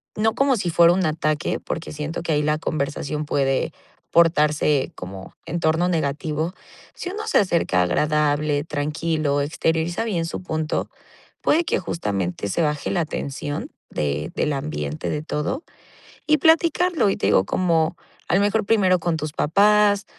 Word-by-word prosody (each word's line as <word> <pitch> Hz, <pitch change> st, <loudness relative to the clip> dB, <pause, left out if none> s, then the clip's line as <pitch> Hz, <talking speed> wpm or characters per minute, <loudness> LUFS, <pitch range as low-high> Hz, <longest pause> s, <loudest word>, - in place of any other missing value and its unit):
no 220 Hz, +1 st, +1 dB
como 270 Hz, +1 st, +2 dB
si 180 Hz, -4 st, -1 dB
fuera 170 Hz, +1 st, +6 dB
un 185 Hz, 0 st, +1 dB
ataque, 155 Hz, 0 st, -1 dB
porque 160 Hz, -, -5 dB
siento 150 Hz, +3 st, -4 dB
que 170 Hz, -, -2 dB
ahí 150 Hz, -1 st, +2 dB
la 150 Hz, +1 st, +1 dB
conversación 150 Hz, -1 st, -3 dB
puede 135 Hz, -2 st, 0 dB, 0.4 s
portarse 150 Hz, -4 st, +3 dB
como 95 Hz, +1 st, -9 dB
en 170 Hz, +1 st, -3 dB
torno 165 Hz, +2 st, +2 dB
negativo. 155 Hz, +1 st, -1 dB, 0.4 s
Si 360 Hz, -, -5 dB
uno 430 Hz, +2 st, -5 dB
se -, -, +3 dB
acerca 170 Hz, -, +2 dB
agradable, 150 Hz, -, +1 dB
tranquilo, 150 Hz, -1 st, -1 dB
exterioriza 160 Hz, +5 st, -1 dB
bien 175 Hz, -7 st, -1 dB
su 165 Hz, -, -5 dB
punto. 160 Hz, -3 st, -2 dB, 0.5 s
Puede 330 Hz, +3 st, +3 dB
que -, -, +1 dB
justamente 100 Hz, -, -3 dB
se 170 Hz, -, 0 dB
baje 150 Hz, -1 st, -1 dB
la 175 Hz, -3 st, +1 dB
tensión 145 Hz, 0 st, -5 dB, 0.2 s
de 75 Hz, +1 st, -2 dB
del 150 Hz, -, 0 dB
ambiente 75 Hz, -, -3 dB
de 150 Hz, -, -2 dB
todo, 155 Hz, -, -3 dB, 0.6 s
y 305 Hz, 0 st, +5 dB
platicarlo. 330 Hz, -, +3 dB
Y -, -, -1 dB
te -, -, -2 dB
digo, 95 Hz, -2 st, +4 dB
como, 170 Hz, -, +1 dB, 0.3 s
a -, -, +3 dB
lo 195 Hz, -, +4 dB
mejor, 205 Hz, +2 st, +2 dB
primero 190 Hz, -4 st, +3 dB
con 165 Hz, -1 st, -1 dB
tus 155 Hz, -1 st, -5 dB
papás, 205 Hz, +5 st, +3 dB
160 Hz, 160 wpm, -22 LUFS, 145-185 Hz, 0.6 s, fuera